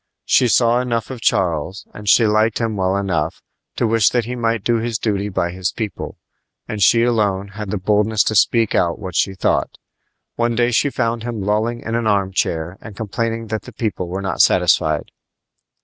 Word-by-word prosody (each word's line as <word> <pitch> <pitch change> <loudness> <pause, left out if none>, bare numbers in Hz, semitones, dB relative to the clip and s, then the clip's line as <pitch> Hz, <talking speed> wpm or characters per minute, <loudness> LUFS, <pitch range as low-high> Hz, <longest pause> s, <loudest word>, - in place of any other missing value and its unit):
She 125 - +4
saw 120 +1 +3
enough 120 -1 -2
of 125 -3 -7
Charles, 90 -1 0
and 105 -1 -4
she 115 - +6
liked 110 +1 +2
him 115 -2 -1
well 95 0 0
enough, 85 -5 -2 0.3
to - - 0
wish 115 -1 +3
that 120 -3 0
he 125 +2 -4
might 115 -3 -1
do 120 +1 +2
his 115 0 -2
duty 105 -2 -1
by 85 -3 -1
his 95 +1 -2
people; 110 -4 -5 0.5
and 105 - -4
she 115 +5 +5
alone 100 -5 0
had 105 0 -7
the 105 - -1
boldness 105 +2 +2
to - - -1
speak 115 +1 +3
out 85 -2 +1
what 95 -4 -7
she 95 +1 +1
thought. 95 - 0 0.6
One 120 0 +1
day 120 +1 +2
she 135 +4 +2
found 115 -3 -1
him 115 -1 -4
lolling 110 +4 0
in 115 - -5
an 115 -1 0
arm 100 -2 +1
chair 85 +1 -2
and 105 -3 -11
complaining 115 +1 -3
that 110 0 -2
the - - -12
people 105 -6 -3
were 95 +3 -4
not 95 - +1
satisfied. 75 -1 +2
110 Hz, 195 wpm, -19 LUFS, 95-115 Hz, 0.6 s, she